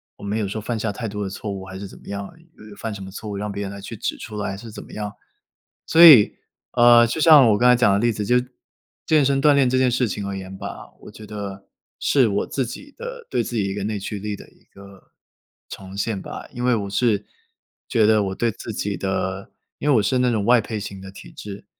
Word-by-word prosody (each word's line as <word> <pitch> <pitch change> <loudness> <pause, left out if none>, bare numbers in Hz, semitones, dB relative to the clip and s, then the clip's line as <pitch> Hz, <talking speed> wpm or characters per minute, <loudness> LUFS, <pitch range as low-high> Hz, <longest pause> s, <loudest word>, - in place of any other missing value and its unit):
我 - - -15
没 105 +2 -2
有 105 - -1
说 110 +3 -4
犯 115 +1 -3
下 110 -1 -2
太 115 +2 -5
多 105 0 -4
的 - - -4
错 100 +1 -6
误， 95 -1 -6
还 95 0 -9
是 100 +1 -7
怎 - - -14
么 - - -18
样 100 0 -4
呃， - - -18 0.4
犯 110 -2 -4
什 100 - -8
么 95 - -9
错 105 +2 -8
误 100 - -4
让 105 0 -4
别 100 +1 -4
人 100 - -5
来 100 0 -9
去 115 +3 -8
指 - - -3
出 105 -1 -8
来， 100 -1 -2
还 95 - -6
是 115 +2 -10
怎 - - -9
么 - - -14
样。 105 -1 -5 0.7
所 165 +1 +6
以， 135 -11 +9 0.4
呃， 120 -1 +7
就 135 +7 -3
像 150 -7 +8
我 105 - +3
刚 125 - +4
才 - - +7
讲 110 -5 +3
的 100 - +3
例 120 +1 +2
子， 105 0 -4
就 125 +4 +3 0.7
健 155 -3 +3
身 135 0 +1
锻 150 - +6
炼 140 -2 +4
这 130 +1 +1
件 130 -1 +3
事 125 0 +1
情 100 0 -4
而 100 - -4
言 95 0 -8
吧， - - -8
我 - - -12
觉 110 - -12
得 100 -2 -7 0.3
是 135 -4 +3
我 100 0 -1
自 135 -3 -2
己 280 - -9
的 485 0 -8
对 - - +1
自 - - -6
己 105 - +1
一 95 - -3
个 100 -1 -4
内 105 -1 -2
驱 105 +1 -5
力 105 +1 -4
的 - - -14
一 - - -26
个 100 -1 -17 0.6
重 95 0 -9
现 100 0 -2
吧。 - - -8
因 120 - -5
为 125 -1 +3
我 100 -3 -3
是 105 -1 +1 0.6
觉 110 - +2
得 110 -1 +4
我 95 -1 -3
对 120 +2 0
自 115 +2 -8
己 100 -1 -3
的 95 +1 -3 0.3
因 150 - -2
为 145 - +5
我 110 - +3
是 130 +5 +1
那 125 0 +2
种 105 -3 0
外 120 +2 +5
配 110 0 -5
型 100 -1 -7
的 95 0 -9
体 - - -12
质， 100 -1 -9
105 Hz, 285 characters per minute, -22 LUFS, 100-120 Hz, 0.7 s, 以